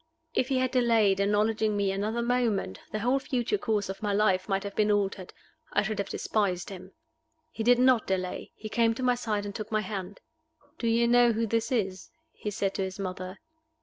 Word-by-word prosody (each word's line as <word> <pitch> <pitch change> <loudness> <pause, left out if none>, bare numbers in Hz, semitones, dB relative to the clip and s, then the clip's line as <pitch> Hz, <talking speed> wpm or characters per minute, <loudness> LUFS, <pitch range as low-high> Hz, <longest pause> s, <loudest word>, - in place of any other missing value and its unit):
If 255 - +1
he 265 -1 +1
had 255 0 +1
delayed 230 -6 +3
acknowledging 210 +1 +2
me 200 -1 +1
another 215 +4 -1
moment, 235 - 0
the - - -2
whole 250 +4 +2
future 265 - -1
course 215 - 0
of 195 0 -6
my 210 -1 0
life 200 -2 +2
might 195 0 0
have 200 0 -6
been 210 0 +2
altered 200 -2 0 0.4
I 205 - +3
should 215 0 -3
have 200 - -2
despised 195 -4 -1
him. 190 0 -10 0.6
He 225 - -6
did 245 +2 +5
not 255 -2 +4
delay. 185 -1 -2
He 215 - -7
came 230 +1 +2
to 255 - -4
my 250 0 +4
side 215 -4 -2
and 200 - -5
took 215 +1 -6
my 215 -1 +2
hand. 200 -2 -6 0.6
"Do 235 - -1
you 230 +1 +3
know 240 0 +5
who 225 +1 0
this 230 +2 -1
is?" 195 -6 -1 0.2
he 210 - -5
said 195 -1 -1
to - - -3
his 190 0 -5
mother. 185 0 -5
215 Hz, 210 wpm, -28 LUFS, 195-235 Hz, 0.6 s, did